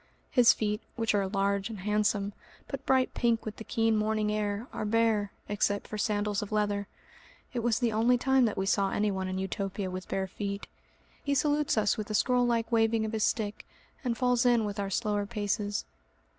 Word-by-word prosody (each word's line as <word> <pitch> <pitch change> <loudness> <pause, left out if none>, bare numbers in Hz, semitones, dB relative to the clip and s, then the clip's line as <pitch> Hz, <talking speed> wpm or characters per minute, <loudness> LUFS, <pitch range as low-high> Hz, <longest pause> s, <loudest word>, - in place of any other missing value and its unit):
His 245 -2 +7
feet, 210 0 -1
which 225 -2 0
are 200 -2 +1
large 200 +1 0
and 215 -4 -7
handsome, 210 0 0 0.3
but 275 0 -6
bright 260 -1 +3
pink 235 -1 +1
with 215 -1 -5
the - - -7
keen 225 -1 +1
morning 215 0 +1
air, 210 +1 -1
are - - -3
bare, 215 -2 +2 0.2
except 205 0 0
for 215 - -5
sandals 205 0 0
of 210 - -6
leather. 205 -1 0 0.7
(It 245 - -1
was 235 -1 +1
the 240 -2 +1
only 230 +3 +3
time 265 0 +3
that 215 - -1
we 190 - 0
saw 195 0 +2
anyone 195 -3 0
in 185 0 -3
Utopia 190 0 -3
with 185 0 -6
bare 190 0 -1
feet.) 200 +1 -5 0.6
He 285 0 0
salutes 295 -1 +1
us 210 +1 +2
with 215 -1 -4
a 215 - -1
scroll 245 +2 +3
like 235 -1 0
waving 225 -1 +3
of 215 - -3
his 220 -1 0
stick, 210 -2 -1 0.4
and 240 -3 -1
falls 250 -1 +2
in 240 -3 +4
with 205 0 -4
our 200 -1 -1
slower 205 0 0
paces. 205 -1 -2
215 Hz, 200 wpm, -29 LUFS, 205-230 Hz, 0.7 s, His